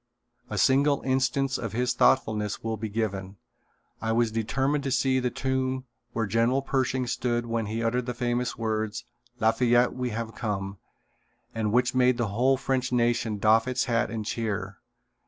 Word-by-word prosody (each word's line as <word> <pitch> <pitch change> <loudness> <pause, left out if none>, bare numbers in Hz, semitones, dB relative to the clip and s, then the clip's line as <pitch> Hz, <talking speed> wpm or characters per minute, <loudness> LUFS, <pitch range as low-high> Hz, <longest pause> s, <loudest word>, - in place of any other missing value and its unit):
A 105 - -4
single 140 +6 +3
instance 135 +1 +1
of 115 -3 -4
his 125 +1 +1
thoughtfulness 110 -5 +2
will 110 0 -1
be 110 0 -5
given. 100 -3 -3 0.6
I 110 - -1
was 115 -1 +2
determined 135 +6 0
to 135 - -1
see 130 0 +2
the 125 -1 0
tomb 130 +1 -2 0.3
where 115 -1 -1
General 115 +6 +1
Pershing 130 -1 0
stood 120 0 -1
when 115 -2 -2
he 110 +2 -2
uttered 120 +2 0
the 125 - -3
famous 120 +1 -1
words: 110 +1 -2 0.3
"Lafayette 120 +2 +3
we 125 -1 -2
have 115 0 -4
come," 100 -3 -4 0.7
and 110 -2 -1
which 125 +2 +2
made 125 -1 +3
the 120 -4 -1
whole 125 +6 +2
French 130 -1 -1
nation 120 -3 +1
doff 110 +3 +4
its 130 -1 0
hat 120 -2 +1
and 110 -2 -4
cheer. 105 -4 -3
120 Hz, 165 wpm, -27 LUFS, 110-130 Hz, 0.7 s, doff